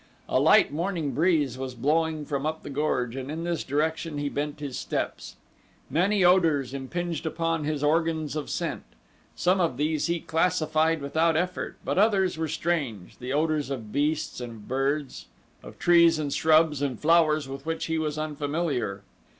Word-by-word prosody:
A - - +2
light - - +5
morning 165 -2 -2
breeze 150 -6 +1
was 130 -1 -5
blowing 155 +4 0
from 140 -2 -2
up 160 +1 -3
the 145 - -7
gorge 130 -4 -1
and 135 0 -5
in 160 +2 -4
this 170 -1 -2
direction 155 +2 -1
he 145 0 -1
bent 145 +1 -3
his 140 -4 -5
steps. - - -4 0.6
Many 190 +6 +2
odors 160 -8 +3
impinged 165 +4 -3
upon 165 -1 -1
his 150 -1 -2
organs 160 0 +1
of 150 - -4
scent. - - -2 0.5
Some 185 +2 +2
of 160 -8 0
these 150 +2 0
he 170 0 0
classified 160 -1 +1
without 160 +3 +2
effort, 180 +2 -2
but - - 0
others 195 -3 +3
were 160 0 -2
strange 140 - -3
the 125 +1 -5
odors 150 -1 0
of 115 -6 -5
beasts 150 -1 -1
and 120 -1 -6
of 105 -2 -13
birds, 135 +2 -2 0.3
of - - -12
trees 170 -2 +5
and 145 -2 -2
shrubs 155 -2 +3
and 135 -5 -2
flowers 155 -2 +3
with 135 +2 -8
which 165 0 -2
he 160 0 -1
was 155 -1 -2
unfamiliar. 145 - -2
155 Hz, 170 wpm, -26 LUFS, 140-165 Hz, 0.6 s, light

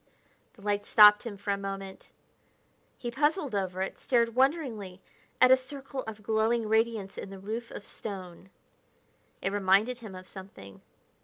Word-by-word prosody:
The 205 - -18
light 205 0 -1
stopped 210 +1 +7
him 205 -3 -6
for 200 +1 -3
a 200 - +1
moment. 195 -1 -7 0.9
He 240 - -5
puzzled 295 - 0
over 190 -2 -1
it; - - -6
stared 235 -2 +2
wonderingly 250 - 0 0.4
at 255 0 +7
a - - +10
circle 270 +1 -7
of 215 -1 -7
glowing 220 +1 +1
radiance 220 -2 0
in - - -7
the 195 - -9
roof 220 +5 -5
of 205 - -9
stone. 190 -3 -7 0.9
It 195 - 0
reminded 205 +5 +2
him 215 -5 -9
of 185 0 -10
something 185 - -11
210 Hz, 155 wpm, -29 LUFS, 195-240 Hz, 0.9 s, a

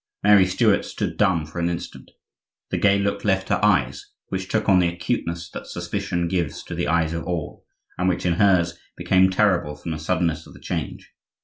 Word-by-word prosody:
Mary 100 -2 +6
Stuart 90 - +2
stood - - -4
dumb 95 -6 +2
for 80 +3 -7
an 85 0 +1
instant; 85 0 -6 0.6
the - - 0
gay 100 -1 +4
look 100 0 -1
left 95 -2 0
her 100 0 0
eyes, 75 -11 +1 0.2
which 95 0 -3
took 110 - -1
on 95 -2 +5
the 90 - +3
acuteness 85 -2 -3
that - - -8
suspicion 85 -1 -3
gives 85 -4 -2
to - - -8
the - - -2
eyes 85 -1 +1
of 85 - -3
all, 85 -3 -5 0.3
and 90 +1 +2
which, 90 0 -2
in 90 - +3
hers, 85 -4 +3 0.2
became 95 0 +3
terrible 95 -6 +1
from 80 +3 -7
the 80 - -4
suddenness 85 0 -1
of - - -15
the - - -13
change. - - -5
90 Hz, 200 wpm, -23 LUFS, 85-95 Hz, 0.6 s, Mary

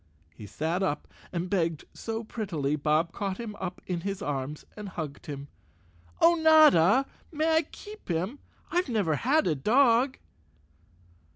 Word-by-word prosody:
He 105 +5 -10
sat 165 - -2
up 185 -6 -1 0.2
and 175 0 -2
begged 165 -5 -1
so 225 0 -4
prettily 170 -11 -2
Bob 155 +3 +1
caught 195 0 -3
him 225 -3 -6
up 180 -1 -5
in 175 -2 -3
his 195 +1 -3
arms 145 +1 -4
and 210 -2 -7
hugged 155 -6 -7
him. 140 -1 -6 0.7
"Oh, 340 - +6
Notta, 305 - +6 0.3
may 320 +1 +2
I - - +5
keep 420 - -12
him? 185 - -2 0.3
I've 355 -4 +1
never 195 -10 +1
had 295 - +2
a 165 - +2
dog!" 240 - +3
190 Hz, 150 wpm, -28 LUFS, 160-260 Hz, 0.7 s, Oh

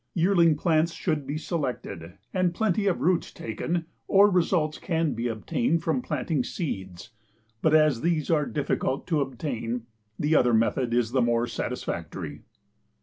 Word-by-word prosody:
Yearling 170 -2 +4
plants 165 +1 +2
should 150 -5 -2
be 145 +2 -2
selected 125 - -4 0.2
and 180 -2 +1
plenty 210 -1 +1
of 185 - +1
roots 180 -1 +1
taken 165 +10 -3 0.2
or 200 +1 +6
results 165 -4 +1
can 165 -4 0
be 115 +2 -2
obtained 120 +7 0
from 155 -6 0
planting 145 +1 -1
seeds, 100 - -5 0.5
but 155 0 +4
as 155 -6 +4
these 165 -3 0
are 150 -3 +2
difficult 140 -2 -1
to 160 -4 +1
obtain, 125 -3 -3 0.3
the 150 +2 +1
other 125 -5 +4
method 115 +2 +1
is 120 -1 +1
the 130 0 +2
more 120 0 +2
satisfactory. 120 - -5
150 Hz, 145 wpm, -26 LUFS, 120-170 Hz, 0.5 s, or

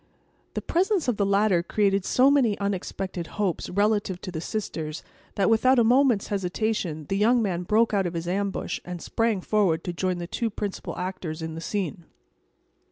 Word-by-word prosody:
The - - -2
presence 370 0 +1
of 245 -4 +1
the 200 - +1
latter 200 -3 +3
created 195 +1 +1
so 260 +2 +4
many 245 -8 +3
unexpected 190 -3 -3
hopes 200 -5 -1
relative 205 -1 +1
to 185 - -6
the 160 -2 -4
sisters 160 -6 -4 0.3
that, 195 -2 +2
without 255 +4 +4
a 235 - +6
moment's 245 -2 +3
hesitation, 190 -4 -2
the 195 - -1
young 235 +4 +4
man 180 -4 -1
broke 215 +5 +2
out 195 -3 +2
of 175 - -5
his 165 +1 -3
ambush, 195 0 -2
and 180 -1 -6
sprang 225 +1 0
forward 180 -6 +1
to 175 - -3
join 185 +1 -1
the 175 - -4
two 230 +6 -2
principal 205 -1 -5
actors 175 -3 -4
in 160 0 -4
the 165 - -6
scene. 175 -3 -3
195 Hz, 180 wpm, -26 LUFS, 175-220 Hz, 0.3 s, a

